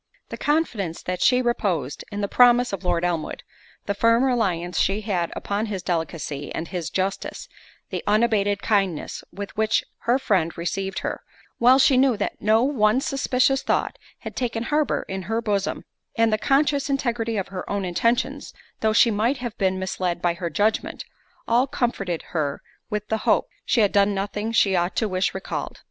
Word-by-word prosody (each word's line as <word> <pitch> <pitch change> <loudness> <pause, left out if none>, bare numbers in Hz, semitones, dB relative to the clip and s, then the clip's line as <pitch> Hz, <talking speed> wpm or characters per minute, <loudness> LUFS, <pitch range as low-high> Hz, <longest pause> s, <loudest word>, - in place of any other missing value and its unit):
The - - -5
confidence 235 - -1
that 180 0 -3
she 250 0 +4
reposed 180 - -1
in 205 0 -3
the 200 - 0
promises 245 0 +5
of 195 - -4
Lord 175 -1 +1
Elmwood—the 175 +4 -5
firm 230 +4 +3
reliance 185 -9 0
she 200 +2 +1
had 185 -5 -1
upon 205 +2 -2
his 195 -4 -4
delicacy 160 -4 -3
and 165 - -4
his 175 -4 -4
justice—the 190 +1 -5
unabated 205 -2 +2
kindness 195 -7 0
with 200 0 -7
which 220 0 +2 0.2
her 240 +2 +2
friend 190 -11 0
received 190 +3 -3
her, - - -3 0.4
while 250 +2 +6
she 270 -1 +5
knew 260 -3 +4
that 205 - -3
no 220 +2 +4
one 250 -4 +3
suspicious 270 0 +1
thought - - -1 0.2
had - - -8
taken 235 -2 -2
harbour 295 +2 0
in 190 0 -4
her 225 +1 +1
bosom—and 215 +1 -2
the - - +3
conscious 280 +2 +2
integrity 235 -5 -1
of 195 - -3
her 190 -2 -6
own 200 -1 -1
intentions, 230 +8 -1 0.2
though 220 0 +2
she 230 +1 +5
might 225 +6 +1
have 240 -3 -5
been 190 -1 +1
misled 185 -1 -2
by 175 -1 +1
her 170 0 -4
judgment, 210 +7 0 0.4
all 240 +3 +3
comforted 195 -10 -2
her 145 -4 -2 0.3
with 210 0 -3
the 220 - +1
hope, - - +2 0.2
she 235 - +3
had 205 - +3
done 200 0 +3
nothing 205 +3 -2
she 200 -4 +3
ought 175 +1 0
to 220 - +1
wish 185 -1 -1
recalled. 190 - -5
205 Hz, 170 wpm, -24 LUFS, 185-235 Hz, 0.4 s, while